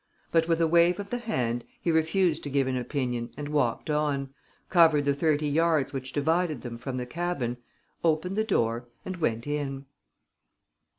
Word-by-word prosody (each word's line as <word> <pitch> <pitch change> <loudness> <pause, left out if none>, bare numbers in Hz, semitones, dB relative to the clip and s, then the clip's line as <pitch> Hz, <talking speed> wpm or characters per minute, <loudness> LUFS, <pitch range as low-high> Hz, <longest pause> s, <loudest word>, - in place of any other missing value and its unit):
But, 165 -1 +3
with 165 -1 +2
a 165 - +4
wave 170 +2 +4
of 200 0 -6
the 245 - -1
hand, 120 - -1 0.2
he 170 - 0
refused 160 +1 +2
to - - -3
give 135 -1 +2
an 130 0 -1
opinion 125 -2 -2
and 145 0 -5
walked 145 -6 0
on, 140 -3 0 0.3
covered 160 -5 +5
the 140 - +3
thirty 150 +1 +1
yards 155 -2 +2
which 130 -1 -3
divided 160 0 0
them 115 -2 -6
from 130 +1 -4
the 125 - -3
cabin, 140 -4 -2 0.5
opened 165 +3 +1
the 215 - +2
door 120 - 0 0.2
and 185 -1 -4
went 115 -8 -1
in. 140 -2 -3
150 Hz, 175 wpm, -27 LUFS, 130-170 Hz, 0.5 s, covered